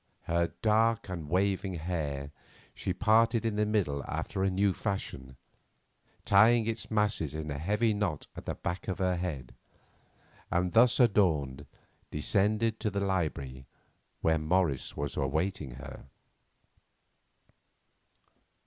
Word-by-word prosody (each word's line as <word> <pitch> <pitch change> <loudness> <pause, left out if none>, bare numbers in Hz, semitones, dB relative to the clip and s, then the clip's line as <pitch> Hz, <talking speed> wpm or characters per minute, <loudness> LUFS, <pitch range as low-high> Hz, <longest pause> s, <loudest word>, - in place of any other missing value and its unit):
Her 85 0 +1 0.2
dark 115 0 +2
and 85 -5 -5
waving 95 +1 0
hair 75 -4 -3 0.4
she 95 - -3
parted 110 +4 +3
in 110 -2 0
the 105 0 +1
middle 85 -10 0
after 95 - -3
a 95 - +3
new 95 +1 +2
fashion, 65 - -4 0.9
tying 110 +3 +5
its 115 0 -3
masses 105 -9 0
in 75 -1 -4
a 70 - -4
heavy 105 +7 +1
knot 100 -8 -2
at - - -9
the - - -2
back 90 +2 -4
of 95 - -2
her 90 -2 +1
head, 80 -9 -4 1.0
and 90 0 0
thus 120 +2 +5
adorned 75 - +2 0.4
descended 105 +8 +1
to 110 - 0
the 100 0 -2
library 75 -10 -2 0.5
where 80 -1 +2
Morris 80 -3 0
was 70 0 -3
awaiting 75 -1 -2
her. 65 0 -10
95 Hz, 125 wpm, -30 LUFS, 75-105 Hz, 1.0 s, tying